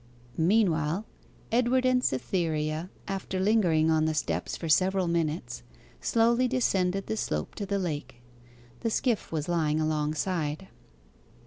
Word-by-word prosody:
Meanwhile 170 -1 +2 0.5
Edward 250 +2 +2
and 255 0 +3
Cytherea, 155 - -1 0.2
after 190 -1 -3
lingering 180 -6 +3
on 155 -1 +3
the 160 0 0
steps - - -2
for 165 - -5
several 185 +3 +3
minutes, 160 - -1 0.4
slowly 235 +2 +3
descended 195 -7 +1
the 220 - -2
slope - - -2
to 200 - -5
the 200 +1 0
lake. 150 -9 -3 0.6
The 230 - -1
skiff 230 0 0
was 155 -2 -2
lying 160 -3 +1
alongside. 155 +2 -1
175 Hz, 125 wpm, -28 LUFS, 155-205 Hz, 0.6 s, and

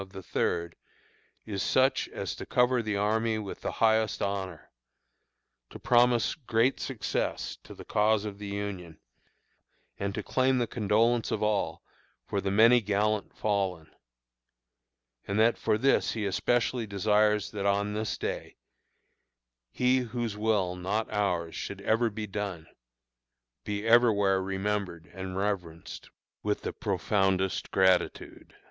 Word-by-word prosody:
of 95 - -9
the 95 0 -9
third, 85 -1 -1 0.7
is 100 -3 -3
such 130 +5 +2
as - - -4
to - - -7
cover 125 0 +2
the 105 -2 -2
army 110 +2 +1
with 105 -3 -6
the - - -3
highest 110 -1 +2
honor 95 -4 -4 1.0
to - - -9
promise 120 -1 +3
great 125 -2 +1
success 125 -6 -3
to - - -11
the - - -11
cause 105 0 +2
of 100 -1 -6
the 105 - -6
Union 100 -5 -5 1.0
and 100 0 -2
to - - -3
claim 130 0 +2
the 120 - +1
condolence 115 +2 +1
of - - -1
all 105 -2 -1 0.4
for 100 - -2
the 95 - -1
many 115 +4 +6
gallant 105 0 -1
fallen; 95 -6 -1 1.4
and 100 +2 -1
that 115 +1 +4
for 105 - 0
this 135 +5 +2
he 110 -2 -3
especially 120 +3 0
desires 105 +1 +2
that 100 -2 -2
on 100 +1 +1
this 110 +1 -2
day, - - -5 1.1
"He 125 - +2
whose 120 -3 -3
will, 105 -4 0
not 100 +5 -2
ours, 90 -5 0
should 100 - -5
ever 115 +3 +2
be 110 0 -5
done," 95 -5 -5 1.0
be 105 0 -3
everywhere 105 -5 +4
remembered 95 -3 -3
and 95 -1 -6
reverenced 90 -5 -4 0.3
with 105 0 -1
the - - -4
profoundest 95 -3 0
gratitude. 95 -1 +1
105 Hz, 135 wpm, -29 LUFS, 95-110 Hz, 1.4 s, many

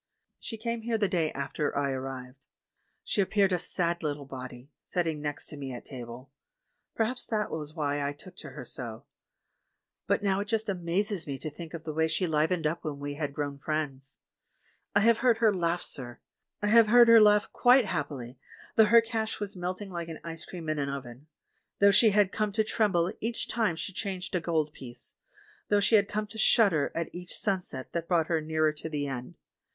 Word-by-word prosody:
She 225 - -6
came 230 +1 -3
here 225 0 0
the 210 -2 +2
day 165 -4 0
after 140 +2 -2
I 140 -1 +1
arrived. 130 0 -6 0.6
She 205 - +1
appeared 195 0 +2
a 180 - +1
sad 170 0 -1
little 145 -2 -3
body, 130 0 -9
sitting 165 -4 -2
next 145 -1 -4
to 150 - -9
me 135 -2 -5
at 120 - -8
table; 125 +1 -9 0.6
perhaps 235 +3 0
that 215 -2 -1
was 155 0 -5
why 145 -2 -1
I 140 - 0
took 180 +5 -13
to - - -8
her 135 -5 -9
so; 120 +1 -7 1.0
but - - +1
now 195 -1 +2
it 205 - -3
just 220 0 -1
amazes 185 0 -1
me 140 -1 -3
to 155 +2 -6
think 165 +2 -8
of 165 - -8
the 155 - -4
way 160 +1 +2
she 180 +3 0
livened 160 +1 +1
up 160 +3 -1
when 150 -3 -4
we 145 0 -4
had 145 -1 -3
grown 145 -2 -3
friends. 140 -3 -3 0.8
I 200 - +5
have 230 +1 +4
heard 240 -2 +4
her 225 -2 +4
laugh, 175 -1 0
sir! 120 -3 -6 0.4
I - - +2
have 230 0 +7
heard 240 +2 +7
her 230 -1 +9
laugh 210 -1 +5
quite 250 0 +5
happily, 135 -7 -4 0.4
though 220 - +8
her 230 +2 +7
cash 225 -1 -3
was 205 -1 -4
melting 185 +2 -4
like 170 -2 -4
an 160 - -7
ice 165 0 -7
cream 170 -3 -8
in 155 -1 -1
an 140 -1 -1
oven; 135 0 -7 0.5
though 200 0 +7
she 220 +3 +6
had 205 -2 +3
come 215 -1 -1
to 220 +1 +2
tremble 195 -5 +1
each 230 +2 -2
time 220 -8 +1
she 190 +4 -5
changed 190 -2 -4
a 180 - +2
gold 160 -3 0
piece; 120 -2 -11 0.6
though 205 - +4
she 205 - +1
had 205 -2 +5
come 215 0 -1
to 215 +1 -10
shudder 195 - +4
at 165 0 -3
each 180 0 -7
sunset 180 -10 -2
that 170 -1 -3
brought 165 -3 +2
her 165 -2 +1
nearer 155 0 +1
to 155 +1 -7
the 145 -2 -2
End. 125 -3 -5
170 Hz, 205 wpm, -29 LUFS, 145-205 Hz, 1.0 s, her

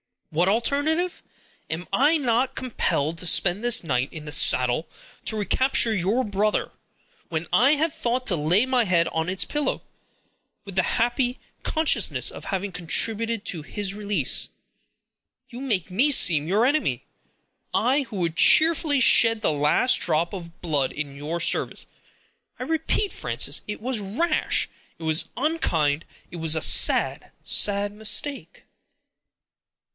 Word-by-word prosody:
"What 170 +4 +1
alternative! 290 - 0 0.5
Am 165 +3 -5
I 295 +5 +3
not 250 -2 0
compelled 165 - -2
to 180 - -2
spend 185 +5 +3
this 240 -4 +3
night 130 -4 -2
in 155 -2 -9
the 150 - -7
saddle 130 +2 +2 0.4
to 220 - +1
recapture 230 +2 +1
your 210 +6 0
brother, 210 0 -1 0.6
when 165 -1 -4
I 255 +5 +4
had 310 +1 0
thought 245 +1 -2
to 180 - +2
lay 170 +10 +2
my 255 -2 +1
head 170 -3 +2
on 160 +2 -3
its 185 +1 0
pillow, 295 -1 -2 0.8
with 195 -2 -10
the 185 - +2
happy 245 +4 -1 0.3
consciousness 315 -1 +1
of - - -10
having 195 +1 -4
contributed 220 +6 -1
to 165 - -2
his 195 +5 -4
release? 200 -9 -2 1.0
You 240 - -9
make 205 -9 -2
me 250 +11 +2
seem 160 - +4
your 205 +6 +2
enemy; 295 +4 -1 0.7
I, 270 +4 +1
who 235 -4 -10
would 165 -1 -2
cheerfully 310 -3 +4
shed 230 -2 +5
the - - +1
last 150 - +2
drop 170 +2 -1
of 170 -2 -10
blood 145 -6 -1
in 145 -2 -5
your 150 +4 -5
service. - - +1 0.7
I - - -6
repeat, 325 +5 -1
Frances, - - -2
it 210 - -6
was 250 -1 -1
rash; 285 - 0 0.3
it - - -12
was 160 +1 +1
unkind; 170 - -1 0.3
it 175 - -8
was 160 -1 +1
a 160 - -2
sad, - - +3
sad 205 0 +2
mistake." 220 +7 -2
205 Hz, 145 wpm, -23 LUFS, 165-255 Hz, 1.0 s, shed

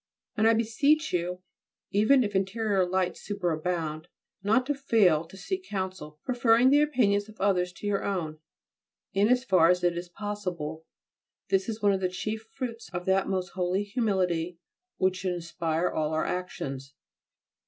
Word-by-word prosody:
And 215 +1 +3
I 225 - +5
beseech 280 +8 +2
you, 180 +1 -2 0.5
even 220 +6 +4
if 205 -2 -3
interior 195 -1 +1
lights 185 0 -1
superabound, 170 -4 -2 0.4
not 220 +6 +2
to 290 - 0
fail 210 - +3
to 190 - -14
seek 380 - -4
counsel, 185 -6 -4
preferring 245 0 +4
the 290 +1 +6
opinions 215 -8 +2
of 215 - -15
others 185 -2 +2
to 205 - -10
your 205 -1 0
own, 160 -6 -3 0.7
in 200 +2 +3
as 250 0 +3
far 180 -8 +4
as 180 0 +2
it 175 -1 +2
is 175 +1 -5
possible. 175 -6 -5 0.6
This 195 +2 +1
is 220 -1 -5
one 205 - +5
of 190 - -1
the 185 - +1
chief 215 +4 -5
fruits 240 -3 -6
of 175 -1 -4
that 190 0 +2
most 185 -2 -1
holy 185 +2 -1
humility 185 -6 0 0.4
which 185 0 +1
should 180 0 -2
inspire 170 0 -1
all 155 0 -1
our 155 - 0
actions. 140 -7 -4
190 Hz, 165 wpm, -28 LUFS, 175-220 Hz, 0.7 s, the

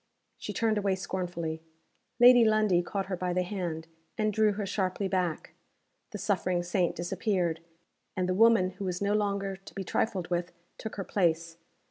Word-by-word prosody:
She - - -5
turned 220 -2 +1
away 195 -2 +1
scornfully. 175 -4 -4 0.6
Lady 245 0 +8
Lundie 215 -5 +3
caught 195 +2 -3
her 190 - -3
by 180 0 -2
the 180 0 +1
hand, 175 -4 -4 0.3
and 215 -1 +1
drew 215 0 +3
her 205 0 -3
sharply 190 0 -1
back. 180 -4 -2 0.6
The 210 - -6
suffering 185 -3 0
saint 175 0 0
disappeared, 175 -1 -1 0.6
and 180 -1 0
the 185 - +1
woman 220 -2 +5
who 195 +1 -7
was 180 -1 -2
no 200 0 +1
longer 200 -2 -1
to 195 - -15
be 195 - -3
trifled 185 -1 -1
with 175 0 -1 0.3
took 220 - -6
her 195 - -3
place. 165 -3 0
190 Hz, 170 wpm, -29 LUFS, 175-205 Hz, 0.6 s, Lady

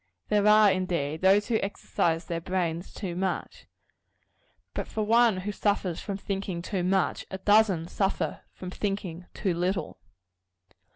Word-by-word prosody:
There 210 -1 +3
are, 210 -1 +7
indeed, 170 -5 -1
those 195 +2 +4
who 225 -2 +2
exercise 170 -4 -1
their 170 -1 -3
brains 175 -1 -2
too 185 -4 -5
much; 185 0 -3 1.1
but - - -3
for 215 - -2
one 225 -3 +4
who 205 +3 -3
suffers 200 -4 0
from 200 -2 -4
thinking 195 -3 -4
too 185 -2 -2
much, 190 +1 +1
a 190 - -4
dozen 200 -4 +3
suffer 195 +2 -1
from 180 -1 -8
thinking 190 -4 -4
too 190 -4 0
little. 180 +3 -2
190 Hz, 140 wpm, -28 LUFS, 175-205 Hz, 1.1 s, are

